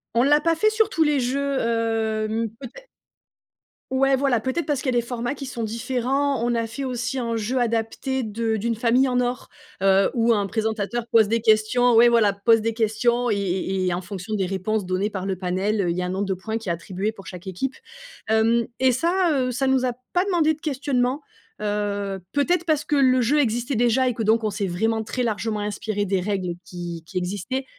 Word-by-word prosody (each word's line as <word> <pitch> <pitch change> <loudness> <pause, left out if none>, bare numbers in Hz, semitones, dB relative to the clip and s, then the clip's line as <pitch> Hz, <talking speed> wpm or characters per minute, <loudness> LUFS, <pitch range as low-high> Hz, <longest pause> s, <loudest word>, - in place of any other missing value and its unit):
On 235 - +4
l'a 295 +2 +5
pas 330 +1 +2
fait 430 +6 +3
sur 435 0 +2
tous 325 - +2
les 295 -2 +2
jeux, 275 +2 -1
hem, 225 -1 -1
peut-être. 280 - -10 1.1
Ouais, 270 +1 +3
voilà, 265 -3 +1
peut-être 260 +7 -2
parce 290 -3 -1
qu'il 260 - 0
y - - +2
a - - +5
des 235 - -4
formats 245 +2 -3
qui 275 -1 -7
sont 245 -2 -6
différents. 255 +4 -1
On 240 0 +1
a 230 -1 0
fait 230 +5 -6
aussi 255 +1 -2
un 230 -2 -2
jeu 230 +4 -1
adapté 240 +3 -1
de 220 +1 -1
d'une 230 +3 -1
famille 245 +4 +3
en 250 -1 +1
or, 250 0 -2 0.3
heu, 195 0 +4
où 230 0 +3
un 205 -2 0
présentateur 220 +2 -2
pose 220 -2 +5
des 230 +2 0
questions, 225 +3 +3
ouais, 235 +1 +7
voilà, 225 -4 +4
pose 225 +3 +3
des 225 +1 -1
questions 235 +2 +1
et 210 - +2
et 190 -1 -1
et 180 - +1
en 180 - -2
fonction 195 +2 -6
des 195 -3 0
réponses 195 +2 -2
données 185 +3 -1
par 190 -2 -4
le 190 - -1
panel, 190 +4 -1
heu, 175 - 0
il 170 - -3
y 180 - 0
a - - -1
un - - -4
nombre 195 +2 -1
de 195 - -1
points 220 +4 -4
qui 225 -4 -6
est - - +2
attribué 190 +5 -3
pour 195 -4 -13
chaque 180 +1 -9
équipe, 220 +9 -3 0.5
hem 225 +1 +3
et 260 0 +4
ça, 340 +7 +1
heu, 255 -3 0
ça 270 +3 -1
nous 265 -1 +2
a 250 - +1 0.2
pas 360 +1 +2
demandé 335 -5 +2
de 305 - -25
questionnement, 270 -3 -1 0.4
heu, 205 -2 -2
peut-être 345 +5 +1
parce 310 -3 +1
que 295 - 0
le 255 -2 +4
jeu 275 +6 +2
existait 240 0 0
déjà 240 +3 +3
et 250 - +1
que 225 - -2
donc 225 +2 +3
on 215 - +1
s'est 200 0 -2
vraiment 220 +5 0
très 250 +3 -3
largement 215 -1 -1
inspiré 205 0 -2
des 195 -1 0
règles 185 -2 -2
qui 175 -2 -7
qui 185 +3 -6
existaient. 205 +9 -3
230 Hz, 225 wpm, -23 LUFS, 205-260 Hz, 1.1 s, ouais